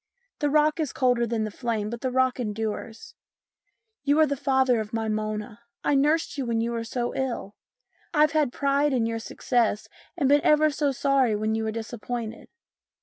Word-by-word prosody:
The 295 - +1
rock 305 +2 +3
is 305 -5 -1
colder 245 -2 +2
than 225 -1 -1
the 215 - -3
flame, 220 -2 -2
but 235 - -6
the 260 - 0
rock 260 0 +1
endures. 220 0 -4 0.9
You 285 +1 +3
are 315 - +7
the 285 -1 -1
father 265 -3 +2
of 215 0 -5
my 225 -1 -1
Mona. 215 0 -3 0.2
I - - +2
nursed 295 +2 +2
you 265 - -1
when 230 -1 0
you 230 +1 -1
were 230 -1 -2
so 240 +1 -3
ill. 245 -6 -3 0.6
I've 300 -2 +4
had 300 -5 +1
pride 280 +2 +1
in 240 -3 +1
your 230 0 -2
success 225 -2 0 0.3
and 285 -5 +2
been 290 +1 +5
ever 305 0 +4
so 290 0 0
sorry 270 -4 +2
when 215 +1 -1
you 220 0 -1
were 220 - -1
disappointed. 230 0 -5
245 Hz, 190 wpm, -26 LUFS, 225-280 Hz, 0.9 s, are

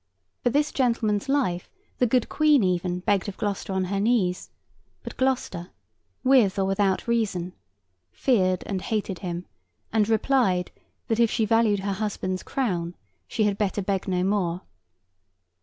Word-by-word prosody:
For - - +2
this 290 +4 +1
gentleman's 230 -3 0
life 245 -11 0 0.3
the 250 - +4
good 245 +1 +2
Queen 300 -5 +4
even 180 -1 0
begged 200 +1 +1
of 195 - -9
Gloucester 200 -1 -3
on 190 0 0
her 195 +2 -2
knees; 200 -5 +1 0.5
but - - -7
Gloucester 245 -9 -1 0.5
(with 255 -8 +4
or 195 - +2
without 195 +1 +1
reason) 200 -7 -1 0.6
feared 185 -8 +1
and 190 -2 -3
hated 205 -4 -2
him, 175 -1 -4 0.5
and 220 -1 +2
replied, 220 -6 +2 0.4
that 225 0 0
if 230 -1 +5
she 225 -1 +1
valued 215 -2 +3
her 200 0 -1
husband's 190 -2 -3
crown, 180 -10 -2 0.3
she 220 - 0
had 205 -1 0
better 205 -1 0
beg 195 0 -1
no 180 -1 0
more. 185 -3 0
200 Hz, 150 wpm, -25 LUFS, 185-230 Hz, 0.6 s, if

